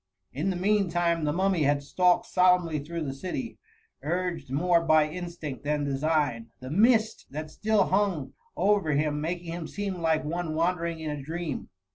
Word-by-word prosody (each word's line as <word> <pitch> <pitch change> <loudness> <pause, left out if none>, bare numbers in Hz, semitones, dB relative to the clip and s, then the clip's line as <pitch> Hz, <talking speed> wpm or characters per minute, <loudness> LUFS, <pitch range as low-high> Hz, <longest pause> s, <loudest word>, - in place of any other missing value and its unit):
In 155 +8 -1
the 190 - -1
mean 200 +1 +2
time 170 -2 +1
the 150 - +1
Mummy 185 +1 +1
had 145 0 +2
stalked 180 +4 +2
solemnly 180 -4 +3
through 165 +3 -5
the 135 -3 -3
city, 185 - -5 0.4
urged 175 -1 -2
more 170 +5 +3
by 155 -2 +4
in 170 +4 -4
stinct 160 -6 -7
than 145 +1 -1
design; 140 -4 0
the 130 +1 -8
mist 220 +4 +3
that 155 +2 -6
still 215 +2 +2
hung 190 -7 0 0.2
aver 195 -6 +2
him, 150 +1 0
making 170 +1 -3
him 170 -2 -5
seem 195 -3 -4
like 160 -1 +2
one 165 0 -2
wandering 170 0 0
in 155 -1 -3
a 145 -1 -4
dream. 160 +1 -4
165 Hz, 175 wpm, -27 LUFS, 150-180 Hz, 0.4 s, by